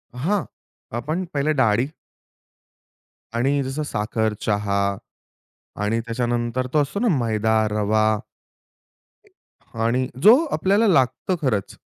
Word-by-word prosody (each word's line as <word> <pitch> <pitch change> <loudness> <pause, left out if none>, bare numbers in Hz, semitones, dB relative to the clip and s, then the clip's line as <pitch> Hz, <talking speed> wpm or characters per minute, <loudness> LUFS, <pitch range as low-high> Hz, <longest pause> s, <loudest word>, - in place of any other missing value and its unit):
हां. 180 +10 0 0.5
आपण 155 +9 -2
पहिलं 150 +1 +1
डाळी 120 0 +2 1.5
आणि 135 +4 +1
जसं 135 +3 -3
साखर, 110 -3 -1
चहा 100 -1 0 1.0
आणि 115 +2 0
त्याच्यानंतर 120 +1 -2
तो 150 - +4
असतो 145 +8 -3
ना 240 - +1
मैदा, 110 -2 +1 0.2
रवा. 110 0 +2 1.7
आणि 125 +2 +1 0.2
जो 220 +4 +9 0.2
आपल्याला 205 +4 +2
लागतं 140 +3 +2
खरंच. 110 -9 -1
125 Hz, 100 wpm, -22 LUFS, 110-145 Hz, 1.7 s, जो